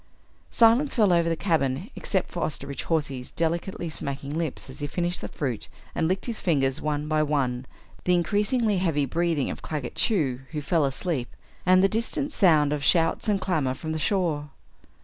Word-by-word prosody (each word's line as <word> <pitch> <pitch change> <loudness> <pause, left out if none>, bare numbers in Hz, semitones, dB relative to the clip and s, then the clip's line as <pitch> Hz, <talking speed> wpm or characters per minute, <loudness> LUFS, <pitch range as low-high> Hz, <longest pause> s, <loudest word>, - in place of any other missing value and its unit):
Silence 235 +5 +4
fell 210 -7 +4
over 170 -1 +3
the 165 - +1
cabin 160 -1 0
except 190 -3 -2
for 175 - -4
Osterbridge 140 -2 -4
Hawsey's 140 -6 -1
delicately 170 +2 -2
smacking 140 -1 -5
lips 160 -4 -3
as 130 - -10
he 145 - -2
finished 175 +3 -2
the - - -4
fruit 130 -7 -3 0.3
and 160 - +1
licked 185 +3 -1
his 235 -3 -4
fingers 140 -5 +1
one 150 0 -1
by 155 0 +2
one, 130 -4 0 0.4
the 180 - +4
increasingly 205 +5 +1
heavy 160 -6 +1
breathing 165 0 0
of - - -7
Claggett 145 -6 -4
Chew, 150 - +1
who 150 - -1
fell 160 +1 +2
asleep, 135 -1 -2 0.4
and 185 +1 +6
the - - +7
distant 230 +7 -1
sound 155 - +4
of 145 -1 -2
shouts 165 +6 +2
and 200 -2 +2
clamor 150 -9 0
from 155 +4 -5
the 160 - -2
shore. 160 -6 0
160 Hz, 180 wpm, -26 LUFS, 145-185 Hz, 0.4 s, the